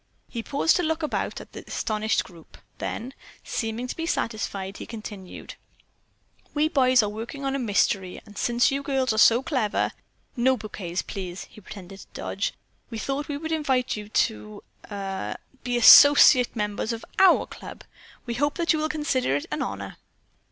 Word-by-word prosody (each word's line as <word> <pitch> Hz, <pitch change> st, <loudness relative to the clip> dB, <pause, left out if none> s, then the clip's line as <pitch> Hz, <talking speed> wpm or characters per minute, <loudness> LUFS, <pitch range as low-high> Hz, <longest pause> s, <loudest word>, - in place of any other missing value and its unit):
He 235 Hz, -, -5 dB
paused 285 Hz, +8 st, +2 dB
to -, -, +1 dB
look 320 Hz, -1 st, -1 dB
about 305 Hz, -, -2 dB
at -, -, -12 dB
the -, -, -9 dB
astonished 215 Hz, 0 st, -1 dB
group. 170 Hz, -3 st, -16 dB, 0.2 s
Then, 255 Hz, +4 st, -4 dB, 0.3 s
seeming 225 Hz, +2 st, -3 dB
to 255 Hz, -, -5 dB
be 330 Hz, 0 st, -4 dB
satisfied, 200 Hz, -, -3 dB
he -, -, -8 dB
continued: 210 Hz, -4 st, -9 dB, 1.0 s
"We 300 Hz, +1 st, +2 dB
boys 255 Hz, -5 st, +4 dB
are 210 Hz, -, -1 dB
working 235 Hz, +6 st, -6 dB
on 270 Hz, 0 st, -1 dB
a -, -, -1 dB
mystery, 200 Hz, -5 st, 0 dB
and 210 Hz, -1 st, -15 dB
since 240 Hz, +4 st, +2 dB
you 275 Hz, +1 st, -1 dB
girls 265 Hz, -4 st, 0 dB
are 220 Hz, -, 0 dB
so 235 Hz, +3 st, +6 dB
clever 260 Hz, -9 st, 0 dB, 0.4 s
(no 260 Hz, +1 st, +2 dB
bouquets, 185 Hz, -5 st, -5 dB
please; 185 Hz, -2 st, -6 dB
he 215 Hz, -, -16 dB
pretended 195 Hz, -1 st, -11 dB
to -, -, -13 dB
dodge) -, -, -3 dB, 0.3 s
we 230 Hz, -, -6 dB
thought 275 Hz, +5 st, -3 dB
we 290 Hz, -, -3 dB
would 320 Hz, +2 st, -5 dB
invite 270 Hz, -5 st, 0 dB
you 210 Hz, -1 st, -8 dB
to—er—be 195 Hz, -, -4 dB
associate 255 Hz, 0 st, +8 dB
members 210 Hz, +1 st, -2 dB
of 230 Hz, -, -7 dB
our 380 Hz, -2 st, +6 dB
club. -, -, -11 dB, 0.4 s
We 240 Hz, -, -3 dB
hope 290 Hz, +4 st, 0 dB
that 340 Hz, -1 st, +2 dB
you 310 Hz, -, 0 dB
will 310 Hz, 0 st, -1 dB
consider 285 Hz, -, 0 dB
it 145 Hz, -, -2 dB
an -, -, -2 dB
honor." -, -, -5 dB
235 Hz, 170 wpm, -25 LUFS, 205-275 Hz, 1.0 s, associate